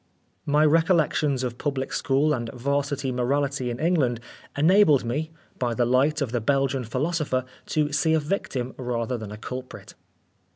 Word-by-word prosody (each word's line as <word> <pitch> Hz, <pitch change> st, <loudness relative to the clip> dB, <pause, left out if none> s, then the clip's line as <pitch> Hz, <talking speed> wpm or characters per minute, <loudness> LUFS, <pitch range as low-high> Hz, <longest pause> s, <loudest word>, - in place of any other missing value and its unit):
My 150 Hz, +1 st, +4 dB
recollections 155 Hz, -4 st, +2 dB
of 120 Hz, -1 st, -4 dB
public 135 Hz, -3 st, -2 dB
school 140 Hz, +3 st, +2 dB
and 120 Hz, -3 st, -3 dB
'Varsity 140 Hz, +1 st, -1 dB
morality 130 Hz, +1 st, 0 dB
in 120 Hz, -, -4 dB
England, 150 Hz, -8 st, +1 dB, 0.4 s
enabled 155 Hz, -4 st, +5 dB
me, 150 Hz, +7 st, -2 dB, 0.3 s
by 120 Hz, -2 st, -1 dB
the 120 Hz, -, +2 dB
light 135 Hz, +5 st, +2 dB
of 125 Hz, -, -4 dB
the 120 Hz, -1 st, -1 dB
Belgian 135 Hz, +1 st, +1 dB
philosopher, 135 Hz, +1 st, -1 dB, 0.2 s
to 150 Hz, -1 st, 0 dB
see 160 Hz, +2 st, +2 dB
a -, -, +3 dB
victim 145 Hz, -6 st, -3 dB
rather 120 Hz, -1 st, -2 dB
than 110 Hz, -3 st, -7 dB
a 105 Hz, -, -7 dB
culprit. 125 Hz, -3 st, -8 dB
135 Hz, 155 wpm, -25 LUFS, 125-150 Hz, 0.4 s, enabled